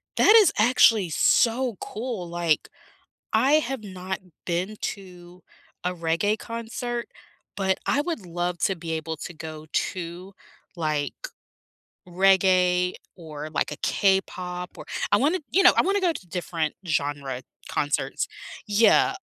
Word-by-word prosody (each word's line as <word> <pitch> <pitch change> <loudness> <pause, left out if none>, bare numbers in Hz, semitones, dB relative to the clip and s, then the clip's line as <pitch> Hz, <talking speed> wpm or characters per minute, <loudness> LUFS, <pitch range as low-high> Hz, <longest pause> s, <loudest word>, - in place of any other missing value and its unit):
That 420 - +6
is 415 -7 +6
actually 220 -4 +5
so 235 - +2
cool, 220 -5 -5
like, 170 -2 0 0.6
I 275 +3 +4
have 270 -6 0
not 185 -1 -5 0.3
been 185 +5 -2
to 180 -2 -7 0.4
a 180 0 -1
reggae 170 +6 0
concert, 235 +1 -5 0.5
but 190 -1 +1
I 285 - +2
would 305 - -3
love 175 +1 -2
to 195 - +1
be 165 0 -5
able 160 0 -3
to 175 - -7
go 155 0 -8
to, 180 +1 -3 0.4
like, 155 -4 -1 0.9
reggae 180 -1 +3 0.2
or, 155 -3 -7
like, 150 - -1
a 150 - -5
K-pop 180 -2 0
or - - -8 0.3
I - - +7
wanna 315 +7 +2
you 390 - +4
know, 360 - +9
I - - +5
wanna 395 +2 +1
go 360 -3 +2
to 190 - -9
different 170 -3 -2
genre 145 -4 -2 0.3
concerts 145 -2 -1 0.4
Yeah. 210 - +4
180 Hz, 135 wpm, -25 LUFS, 170-225 Hz, 0.9 s, know